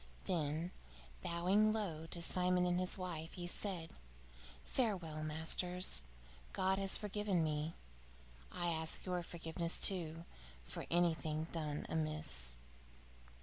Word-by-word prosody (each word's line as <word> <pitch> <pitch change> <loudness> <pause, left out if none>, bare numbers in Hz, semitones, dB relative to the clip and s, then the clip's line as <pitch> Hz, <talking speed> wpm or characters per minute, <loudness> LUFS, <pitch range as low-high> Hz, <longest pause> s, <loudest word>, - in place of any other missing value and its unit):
Then, 160 0 -1 0.5
bowing 185 +5 +3
low 170 -8 -2
to 170 0 -1
Simon 180 +1 +4
and 180 0 +2
his 185 +2 +1
wife, 170 -3 -4
he 175 - -5
said: 175 -2 -1 0.7
"Farewell, 180 - -1
masters. 160 - +2 0.5
God 190 +1 +2
has 195 -1 +6
forgiven 205 -4 0
me. 155 +1 -1 0.8
I 175 -1 -1
ask 160 -1 0
your 180 -1 -1
forgiveness, 170 0 -2
too, 165 -3 0 0.4
for - - -6
anything 160 -2 +1
done 150 -3 -3
amiss." 155 - +1
170 Hz, 110 wpm, -38 LUFS, 160-185 Hz, 0.8 s, has